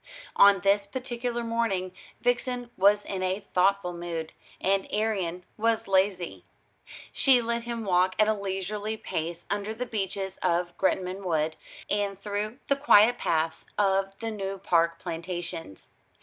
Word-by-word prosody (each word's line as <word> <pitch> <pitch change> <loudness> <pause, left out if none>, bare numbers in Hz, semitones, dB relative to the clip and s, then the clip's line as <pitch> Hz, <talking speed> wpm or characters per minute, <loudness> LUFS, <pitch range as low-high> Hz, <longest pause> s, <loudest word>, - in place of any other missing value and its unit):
On 200 -1 +7
this 200 +1 +2
particular 240 0 -3
morning 225 -6 -1 0.3
Vixen 245 0 -1
was 205 +2 +4
in 190 -1 -4
a 190 +2 -1
thoughtful 185 -1 +2
mood, 170 -2 -5 0.3
and 195 0 +1
Arion 190 -5 -1
was 225 0 +1
lazy. 190 -2 +1 0.7
She 265 -3 +5
let 235 0 -2
him 235 -2 -4
walk 185 0 +3
at 215 - +4
a 220 - +3
leisurely 205 +2 -3
pace 170 -2 -4
under 205 +2 -2
the 250 +3 -3
beeches 195 -3 -3
of 175 0 0
Gretnam 190 0 0
Wood, 160 -3 0 0.3
and 200 -2 -1
through 210 +3 -3
the 280 - +2
quiet 245 -5 +6
paths 160 0 -1
of 195 -1 +1
the 225 -1 -4
New 195 -2 -4
Park 170 -3 +2
plantations. 165 - -6
195 Hz, 140 wpm, -27 LUFS, 180-220 Hz, 0.7 s, On